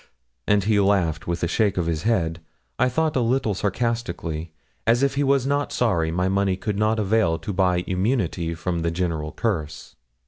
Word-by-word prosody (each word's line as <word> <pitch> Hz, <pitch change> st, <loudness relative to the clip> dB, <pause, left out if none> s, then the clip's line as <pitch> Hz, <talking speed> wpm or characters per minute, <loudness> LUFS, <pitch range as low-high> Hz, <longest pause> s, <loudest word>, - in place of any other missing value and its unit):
and 105 Hz, -1 st, +3 dB
he 105 Hz, +1 st, +2 dB
laughed 95 Hz, -6 st, +1 dB
with 85 Hz, 0 st, -2 dB
a -, -, +2 dB
shake 100 Hz, +2 st, +1 dB
of 90 Hz, -, +1 dB
his 80 Hz, -2 st, -1 dB
head, 85 Hz, -7 st, 0 dB, 0.4 s
I 130 Hz, -, +3 dB
thought 155 Hz, +4 st, 0 dB
a -, -, +3 dB
little 120 Hz, -1 st, +1 dB
sarcastically, 95 Hz, -6 st, -2 dB, 0.4 s
as 120 Hz, +3 st, +4 dB
if 140 Hz, -, +2 dB
he 140 Hz, +1 st, 0 dB
was 135 Hz, -2 st, +2 dB
not 145 Hz, +1 st, 0 dB
sorry 85 Hz, -10 st, +1 dB
my 90 Hz, +3 st, 0 dB
money 95 Hz, -1 st, +1 dB
could 100 Hz, +1 st, -3 dB
not 110 Hz, +1 st, +2 dB
avail 100 Hz, -5 st, +2 dB
to 105 Hz, -, -5 dB
buy 90 Hz, -1 st, +2 dB
immunity 90 Hz, -4 st, -1 dB
from 85 Hz, +1 st, -2 dB
the 85 Hz, 0 st, 0 dB
general 85 Hz, -3 st, -2 dB
curse. 80 Hz, -10 st, -3 dB
95 Hz, 185 wpm, -23 LUFS, 85-115 Hz, 0.4 s, as